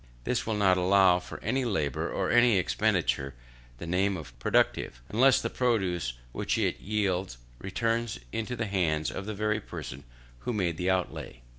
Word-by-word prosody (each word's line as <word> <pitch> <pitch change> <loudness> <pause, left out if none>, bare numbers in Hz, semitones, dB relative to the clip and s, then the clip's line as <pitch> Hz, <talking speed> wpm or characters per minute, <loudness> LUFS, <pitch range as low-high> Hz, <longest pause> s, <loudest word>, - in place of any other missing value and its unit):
They - - 0
will 110 - 0
not 95 -3 +4
allow 95 -1 +5
to - - -9
any 130 0 0
labour 80 - -1
or - - -1
to - - +2
any 120 -3 +6
expenditure 70 -6 0 0.4
the 85 - -7
name 95 +3 +1
of 65 -7 -9
productive, - - +1
unless 130 +5 +5
the - - -2
produce 95 - 0 0.2
which - - -1
it - - 0
yields 95 - -1 0.2
returns 115 - -1
into 115 +2 -3
the 110 -1 -2
hands 85 -6 0
of 95 - -6
the 110 - -3
very 105 +1 0
person 70 -7 -8 0.4
who 120 - -3
made 90 -6 0
the 90 +1 0
outlay. 90 -9 -2
95 Hz, 170 wpm, -29 LUFS, 85-110 Hz, 0.4 s, any